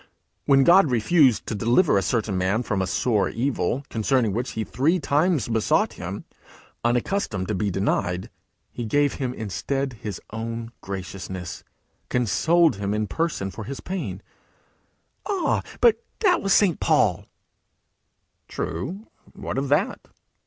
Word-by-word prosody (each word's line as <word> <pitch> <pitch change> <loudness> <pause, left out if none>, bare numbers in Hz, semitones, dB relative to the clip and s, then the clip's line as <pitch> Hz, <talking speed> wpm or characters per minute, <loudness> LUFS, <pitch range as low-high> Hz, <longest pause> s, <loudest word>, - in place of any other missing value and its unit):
When 135 -1 +5
God 175 +1 +6
refused 125 +1 +3
to - - -3
deliver 120 - +3
a 100 - +3
certain 105 +1 -1
man 95 +6 +1
from 105 -4 -1
a 95 - -1
sore 105 +1 +1
evil, 135 +2 -1
concerning 115 -1 +1
which 120 +4 -3
he 110 - -2
three 150 +12 +1
times 155 +1 +1
besought 115 -2 +1
him, - - -6 0.6
unaccustomed 120 - 0
to - - 0
be 100 +1 0
denied, 90 -2 -1 0.4
he 120 - -5
gave 145 +5 +2
him 130 -2 -1
instead 130 +4 -3
his 105 -4 -5
own 115 +1 -5
graciousness, 95 -2 -6 0.5
consoled 145 - +3
him 100 +1 -2
in 105 0 0
person 105 - -2
for 110 - -7
his 135 +4 -6
pain.' 125 - -5 1.0
'Ah, 395 -4 +1 0.2
but 465 0 +4 0.2
that 365 -5 +4
was 195 - -1
St. 190 -5 +4
Paul!' - - +2 1.2
'True; 175 - -4 0.3
what - - -4
of 135 0 -3
that?' 150 +8 +1
120 Hz, 140 wpm, -24 LUFS, 105-150 Hz, 1.2 s, God